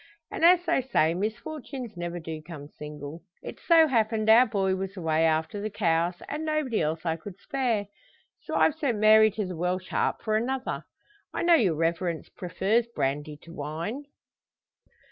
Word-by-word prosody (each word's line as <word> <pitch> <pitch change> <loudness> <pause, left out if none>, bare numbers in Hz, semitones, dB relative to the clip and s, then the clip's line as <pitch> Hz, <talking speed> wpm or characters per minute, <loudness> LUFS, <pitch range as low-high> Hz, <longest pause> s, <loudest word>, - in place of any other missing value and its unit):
And - - -4
as 350 +1 +6
they 270 - +2
say 165 -11 +2
misfortunes 235 - -5
never 175 0 -4
do 160 -1 -6
come 155 -3 -9
single, 150 +2 -9 0.2
it - - -8
so 330 -2 +5
happened 220 -4 +2
our 245 +3 +7
boy 195 -3 0
was 195 +1 -5
away 160 -2 +1
after 160 +6 0
the 215 - -3
cows, 175 -3 0
and 300 +2 -4
nobody 305 -7 0
else 155 +2 -2
I 165 -1 0
could 190 +2 -10
spare. 245 -7 -1 0.5
So - - -6
I've 320 - +4
sent 275 -8 -1
Mary 215 +1 +6
to 210 0 -3
the 180 -1 -5
Welsh 180 +2 -2
Harp - - -1
for 215 -1 0
another. 255 +4 -2 0.5
I - - -1
know 345 0 +5
your 200 - +4
reverence 165 +1 -1
prefers 200 +6 0
brandy 150 -6 -3
to 170 - -12
wine." 165 - -5
195 Hz, 170 wpm, -27 LUFS, 165-235 Hz, 0.5 s, our